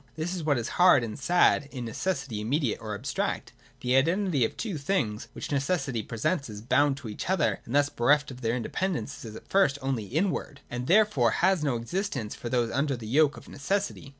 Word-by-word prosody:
This 165 Hz, +3 st, -3 dB
is 180 Hz, -3 st, -4 dB
what 145 Hz, -3 st, +2 dB
is 115 Hz, -, -2 dB
hard 180 Hz, -9 st, +7 dB
and 115 Hz, +3 st, -5 dB
sad 145 Hz, -2 st, +3 dB
in 125 Hz, -4 st, -5 dB
necessity 135 Hz, -, -3 dB
immediate 125 Hz, +1 st, 0 dB
or 110 Hz, -2 st, -4 dB
abstract. 120 Hz, +7 st, -3 dB, 0.3 s
The 125 Hz, +1 st, +1 dB
identity 165 Hz, -, +2 dB
of 115 Hz, -, 0 dB
the -, -, -28 dB
two 200 Hz, -9 st, -3 dB
things, 135 Hz, -, -1 dB
which -, -, -6 dB
necessity 135 Hz, -4 st, 0 dB
presents 120 Hz, -, -2 dB
as 105 Hz, -1 st, -7 dB
bound 135 Hz, +5 st, +2 dB
to 135 Hz, -4 st, -8 dB
each 105 Hz, +10 st, -5 dB
other 115 Hz, -, +1 dB
and 120 Hz, -, -4 dB
thus 145 Hz, 0 st, +4 dB
bereft 145 Hz, +4 st, +2 dB
of 125 Hz, 0 st, -10 dB
their 115 Hz, 0 st, 0 dB
independence, 155 Hz, +5 st, -3 dB
is 110 Hz, -2 st, -8 dB
at -, -, -11 dB
first 190 Hz, -8 st, +3 dB
only 130 Hz, -5 st, -2 dB
inward, 150 Hz, -, -2 dB
and 125 Hz, +1 st, -4 dB
therefore 190 Hz, -, +4 dB, 0.2 s
has 190 Hz, -4 st, +3 dB
no 140 Hz, -4 st, +1 dB
existence 125 Hz, -, -3 dB
for 120 Hz, -, -6 dB
those 120 Hz, -2 st, +1 dB
under 140 Hz, 0 st, 0 dB
the 115 Hz, -, -8 dB
yoke 145 Hz, +5 st, +3 dB
of -, -, -12 dB
necessity. 195 Hz, -1 st, -2 dB
140 Hz, 205 wpm, -28 LUFS, 120-160 Hz, 0.3 s, hard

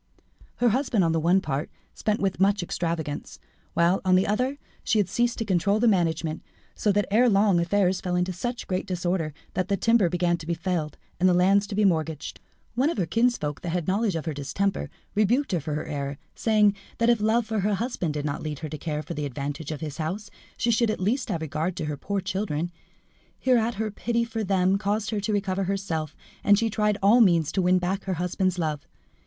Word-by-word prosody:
Her 245 Hz, -, +3 dB
husband, 240 Hz, -4 st, +1 dB
on 165 Hz, -, +2 dB
the 165 Hz, -, +1 dB
one 175 Hz, +4 st, +3 dB
part, 145 Hz, -2 st, -3 dB, 0.2 s
spent 215 Hz, 0 st, -1 dB
with 195 Hz, -2 st, -1 dB
much 195 Hz, 0 st, +3 dB
extravagance, 165 Hz, -4 st, -3 dB, 0.4 s
while, 170 Hz, +3 st, +3 dB
on 185 Hz, -1 st, +4 dB
the 185 Hz, -, +4 dB
other, 255 Hz, +7 st, 0 dB, 0.3 s
she 220 Hz, -, +1 dB
had 205 Hz, -4 st, +3 dB
ceased 240 Hz, 0 st, 0 dB
to 225 Hz, -, -2 dB
control 200 Hz, +2 st, +2 dB
the 240 Hz, -, +3 dB
management, 165 Hz, -5 st, +1 dB, 0.3 s
so 210 Hz, -, +1 dB
that 205 Hz, +1 st, +2 dB
ere 240 Hz, +4 st, +5 dB
long 200 Hz, -3 st, +4 dB
affairs 185 Hz, +1 st, +1 dB
fell 180 Hz, -2 st, -1 dB
into 180 Hz, +1 st, 0 dB
such 240 Hz, +7 st, -4 dB
great 185 Hz, 0 st, -2 dB
disorder, 175 Hz, -3 st, -1 dB, 0.2 s
that 185 Hz, -, -1 dB
the 200 Hz, -, +1 dB
timber 225 Hz, -3 st, +3 dB
began 175 Hz, 0 st, +1 dB
to 160 Hz, -1 st, -10 dB
be 170 Hz, -, 0 dB
felled, 165 Hz, -4 st, -2 dB, 0.2 s
and 185 Hz, +1 st, +5 dB
the 180 Hz, -, +4 dB
lands 195 Hz, +3 st, +4 dB
to 200 Hz, -, -5 dB
be 210 Hz, 0 st, +3 dB
mortgaged. 160 Hz, -4 st, -1 dB, 0.3 s
One 260 Hz, +6 st, +2 dB
of 335 Hz, -, -3 dB
her 185 Hz, -, +1 dB
kinsfolk 225 Hz, -7 st, 0 dB
that 175 Hz, -, -4 dB
had 175 Hz, -3 st, -2 dB
knowledge 200 Hz, 0 st, +1 dB
of 160 Hz, -, -3 dB
her 160 Hz, -, -2 dB
distemper, 145 Hz, +8 st, -2 dB, 0.2 s
rebuked 230 Hz, +7 st, +2 dB
her 175 Hz, -, +1 dB
for 150 Hz, 0 st, -4 dB
her 150 Hz, -, -3 dB
error, 140 Hz, -1 st, -4 dB, 0.2 s
saying 210 Hz, -2 st, +3 dB, 0.2 s
that 230 Hz, +1 st, +4 dB
if 235 Hz, -3 st, +1 dB
love 220 Hz, +2 st, +2 dB
for 220 Hz, -1 st, -2 dB
her 205 Hz, +1 st, +1 dB
husband 195 Hz, -, -2 dB
did 145 Hz, 0 st, -2 dB
not 145 Hz, -1 st, -2 dB
lead 150 Hz, -2 st, -4 dB
her -, -, -5 dB
to 155 Hz, -, -6 dB
care 150 Hz, -2 st, -3 dB
for 170 Hz, -, -6 dB
the 150 Hz, -2 st, -3 dB
advantage 140 Hz, +3 st, -5 dB
of 155 Hz, -3 st, -5 dB
his 155 Hz, -2 st, -5 dB
house, 185 Hz, +7 st, -4 dB, 0.3 s
she 235 Hz, -, +1 dB
should 230 Hz, 0 st, +2 dB
at 215 Hz, -, -1 dB
least 230 Hz, +8 st, 0 dB
have 170 Hz, -5 st, -2 dB
regard 160 Hz, +3 st, -2 dB
to 155 Hz, -, -3 dB
her 150 Hz, -1 st, -2 dB
poor 200 Hz, +7 st, -3 dB
children. 175 Hz, -4 st, -2 dB, 0.7 s
Hereat 240 Hz, -3 st, +2 dB
her 215 Hz, +1 st, -2 dB
pity 235 Hz, +3 st, -1 dB
for 225 Hz, -1 st, -3 dB
them 190 Hz, 0 st, +2 dB
caused 205 Hz, +2 st, -1 dB
her 215 Hz, -, -1 dB
to 205 Hz, +2 st, -2 dB
recover 195 Hz, -2 st, 0 dB
herself, 180 Hz, -6 st, -2 dB, 0.3 s
and 205 Hz, 0 st, +5 dB
she 225 Hz, 0 st, 0 dB
tried 210 Hz, -1 st, +1 dB
all 225 Hz, +5 st, +6 dB
means 170 Hz, -7 st, +4 dB
to 190 Hz, -, +1 dB
win 180 Hz, 0 st, +4 dB
back 185 Hz, +2 st, -2 dB
her 190 Hz, -1 st, -1 dB
husband's 180 Hz, +1 st, 0 dB
love. 155 Hz, -4 st, -2 dB
190 Hz, 225 wpm, -26 LUFS, 165-215 Hz, 0.7 s, all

